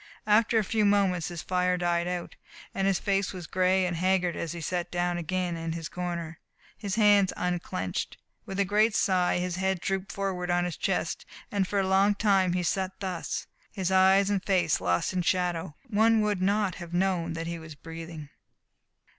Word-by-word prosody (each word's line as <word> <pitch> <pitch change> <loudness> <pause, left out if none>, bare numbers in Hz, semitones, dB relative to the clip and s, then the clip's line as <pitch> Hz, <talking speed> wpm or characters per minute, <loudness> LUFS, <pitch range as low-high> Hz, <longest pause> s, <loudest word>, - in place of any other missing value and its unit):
After 220 +2 +4
a 220 - +3
few 215 +2 0
moments 195 -4 +2
this 170 -2 -6
fire 180 0 +1
died 175 -1 0
out, 180 -1 -4 0.4
and 195 0 0
his 195 -2 +2
face 195 -1 0
was 180 -2 -7
gray 185 +2 +2
and 175 -1 -1
haggard 180 0 +1
as 165 - -4
he 170 - -6
sat 175 +2 -2
down 175 0 -1
again 180 +1 -2
in 165 0 -4
his 165 -1 -5
corner. 170 -2 -5 0.4
His 200 -2 -4
hands 205 -3 +5
unclenched. 175 - -3 0.3
With 195 - -4
a 200 - +3
great 210 +3 +2
sigh 185 -3 +2
his 180 0 -2
head 190 -1 0
drooped 195 +1 -2
forward 190 -3 -3
on 175 0 +2
his 175 -3 -3
chest, - - -2 0.2
and 200 -2 0
for 200 - 0
a 190 - +1
long 195 +2 +4
time 195 -4 +2
he 180 0 0
sat 190 +2 -2
thus, 185 -4 -3 0.3
his 190 -3 -2
eyes 190 +1 +5
and 200 -2 0
face 175 - +1
lost 90 - 0
in 185 - 0
shadow. 175 -3 -1
One 225 0 +3
would 210 -3 0
not 200 0 +1
have 170 0 -6
known 175 -3 0
that 165 0 -4
he 170 0 -4
was 160 -1 -10
breathing. 165 -1 -9
185 Hz, 190 wpm, -28 LUFS, 175-195 Hz, 0.4 s, hands